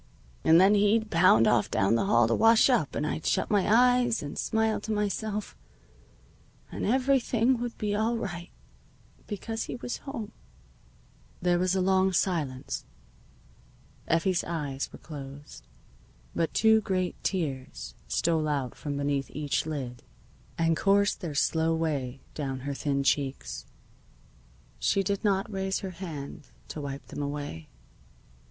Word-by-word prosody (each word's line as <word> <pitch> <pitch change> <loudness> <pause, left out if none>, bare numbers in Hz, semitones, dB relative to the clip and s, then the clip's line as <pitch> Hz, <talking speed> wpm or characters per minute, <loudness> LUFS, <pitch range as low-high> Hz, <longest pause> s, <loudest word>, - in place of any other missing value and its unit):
"And 160 +1 +6
then 190 +3 +6
he'd 210 +2 +3
pound 165 -10 +6
off 105 - +3
down 95 +3 +2
the 115 - +2
hall 120 -1 +4
to 115 - +1
wash 225 - +5
up, 155 - +1
and 150 - -1
I'd 155 - -3
shut - - 0
my 205 -1 +2
eyes, 245 -1 +4
and 145 - -6
smile 220 -1 0
to 220 - -4
myself, 210 0 -2 1.2
and - - -3
everything 255 -1 +2
would 240 -1 -4
be 210 -1 -1
all 225 +3 +1
right, 175 -5 -5 0.8
because 225 +2 -4
he - - -5
was 245 0 -4
home." 230 -7 -6 1.1
There 175 -1 +2
was 185 +1 +1
a 190 - +2
long 190 0 +3
silence. 155 -9 -1 1.2
Effie's 170 +2 +2
eyes 145 -5 -3
were - - -10
closed. 145 -1 -10 0.7
But 165 - -1
two 220 0 +5
great 185 -3 -2
tears 135 - -3
stole 160 - +1
out 140 -5 -1
from 145 -1 -5
beneath 140 -1 -1
each 150 +1 -2
lid 130 -6 -5 0.6
and 165 0 +2
coursed 200 +4 +2
their 165 -6 -4
slow 160 +2 +2
way 140 -5 -2
down 135 -3 -4
her 140 +2 -3
thin 140 0 -1
cheeks. 135 - -1 1.1
She 195 - +2
did 200 +2 -2
not 195 -1 +1
raise 190 0 -1
her 190 - -5
hand 155 -6 -7 0.2
to 155 - -5
wipe 140 -1 -6
them - - -5
away. 145 - -5
170 Hz, 145 wpm, -28 LUFS, 140-205 Hz, 1.2 s, And